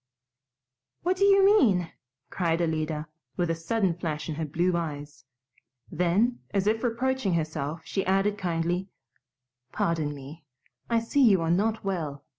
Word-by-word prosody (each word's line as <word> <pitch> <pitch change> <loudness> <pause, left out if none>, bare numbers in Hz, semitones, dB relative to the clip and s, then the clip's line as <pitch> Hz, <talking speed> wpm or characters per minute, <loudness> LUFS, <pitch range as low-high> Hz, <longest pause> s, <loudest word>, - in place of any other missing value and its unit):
"What 360 +2 +2
do 395 - +3
you 395 -1 +6
mean?" 215 - +4 0.4
cried 170 -2 0
Alida, 155 -2 -1 0.3
with 175 -2 +1
a - - 0
sudden 185 +3 0
flash 160 -3 -4
in - - -1
her 160 +1 -3
blue 170 +4 0
eyes. 150 -4 -5 0.7
Then, 180 +9 +1
as 195 -1 0
if 220 +2 +1
reproaching 245 -4 0
herself, 155 -1 -3
she 195 - -2
added 195 +2 +2
kindly, 175 0 -2 0.8
"Pardon 155 -3 -1
me. 145 +4 -11 0.5
I 230 -1 +2
see 255 +5 +1
you 210 -8 +6
are 165 - +1
not 215 +5 +1
well. 155 -8 -3
175 Hz, 145 wpm, -27 LUFS, 160-215 Hz, 0.8 s, you